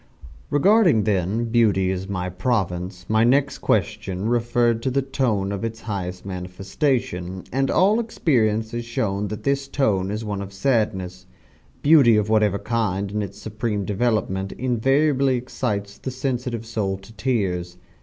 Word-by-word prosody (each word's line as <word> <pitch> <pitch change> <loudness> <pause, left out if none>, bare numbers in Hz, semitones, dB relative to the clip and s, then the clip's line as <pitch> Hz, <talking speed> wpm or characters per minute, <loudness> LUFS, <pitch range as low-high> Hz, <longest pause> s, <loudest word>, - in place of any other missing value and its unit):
Regarding, 175 - +4
then, 105 +3 0
Beauty 105 -5 +3
as 95 +1 -4
my 90 -2 -2
province, 90 -3 -2
my 110 +1 +3
next 135 +4 +2
question 95 +2 -1
referred 120 0 +1
to 130 - 0
the 135 +1 0
tone 120 -8 0
of 100 0 -4
its 115 0 -4
highest 95 -4 -5
manifestation 95 +1 -2
and 135 +1 +1
all 200 +5 +4
experience 115 - +1
has 120 0 -3
shown 105 -3 -2
that 105 +1 -6
this 140 0 0
tone 100 -10 +1
is 105 +2 -3
one 100 -2 -3
of 100 0 -8
sadness. 95 -5 -1 0.6
Beauty 145 -7 +6
of 105 0 0
whatever 105 -2 +3
kind 100 -3 -1
in 105 0 -1
its 100 -1 -6
supreme 105 -1 -3
development 100 -2 -1
invariably 135 +2 +2
excites 105 -5 -3
the - - -4
sensitive 125 -3 -3
soul 105 -4 -2
to 95 +3 -15
tears. 95 -8 -1
110 Hz, 145 wpm, -23 LUFS, 95-125 Hz, 0.6 s, Beauty